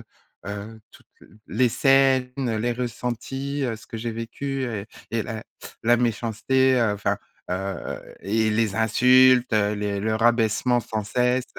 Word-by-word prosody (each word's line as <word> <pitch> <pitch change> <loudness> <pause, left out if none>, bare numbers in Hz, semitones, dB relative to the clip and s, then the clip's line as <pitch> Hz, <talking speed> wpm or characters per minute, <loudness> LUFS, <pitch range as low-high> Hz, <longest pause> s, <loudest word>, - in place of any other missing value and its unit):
heu, - - -11 0.5
heu, 105 +2 -7
toutes - - -19 0.4
les 130 -1 +2
scènes, 135 0 +3
les 120 -3 -1
ressentis, 125 +3 -4
heu, 115 -3 -2
ce 110 - -16
que 115 - -7
j'ai 115 +1 -3
vécu 130 +4 -4
et 110 -4 -4 0.3
et 115 - 0
la 110 -1 -6 0.4
la 120 +1 +5
méchanceté, 120 +3 +1
heu, 105 -3 +2
enfin, 100 - -1 0.4
heu 95 +1 -3 0.5
et 110 +3 +1
les 105 -2 +1
insultes, 125 +3 +5
heu, 105 -1 +2
les 100 -1 -2
le 110 +1 0
rabaissement 115 +1 +2
sans 110 -2 -4
cesse, 125 +3 +1
115 Hz, 150 wpm, -24 LUFS, 110-125 Hz, 0.5 s, la